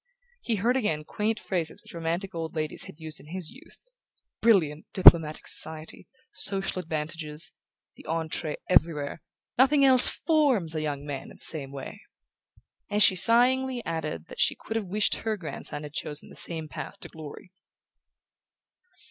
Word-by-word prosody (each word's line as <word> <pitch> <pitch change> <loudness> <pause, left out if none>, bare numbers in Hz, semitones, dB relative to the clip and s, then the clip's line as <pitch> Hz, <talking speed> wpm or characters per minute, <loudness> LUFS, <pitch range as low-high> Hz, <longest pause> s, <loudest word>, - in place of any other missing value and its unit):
He 230 - -1
heard 230 +5 +1
again 160 -11 -1
quaint 215 +7 -2
phrases 175 -6 -4
which - - -15
romantic 170 +3 -3
old 165 0 -5
ladies 155 -1 -3
had 150 - -13
used 155 -1 -6
in - - -16
his 175 -1 -4
youth: - - -14 0.5
"Brilliant 165 -10 +2
diplomatic 165 -5 +6
society... 160 0 +1 0.2
social 195 -1 +1
advantages... 155 -2 -4 0.4
the - - -15
entree 160 -1 -2
everywhere... 155 -4 +1 0.4
nothing 275 +2 +5
else 255 -2 +6
FORMS 275 - +1
a 155 - -3
young 145 -2 -4
man 140 -2 -6
in - - -15
the - - -12
same 140 -4 +2
way..." 140 -1 -9 0.9
and 210 0 +3
she 190 - +6
sighingly 250 +4 +5
added 155 - -4
that - - -7
she - - +3
could 220 - -8
have 225 -2 -2
wished 205 +3 +1
her 220 -1 -3
grandson 160 -3 -7
had 150 -1 -9
chosen 150 -1 -4
the - - -14
same 160 -2 -1
path - - -8
to - - -5
glory. 160 +3 -11
165 Hz, 155 wpm, -26 LUFS, 155-215 Hz, 0.9 s, diplomatic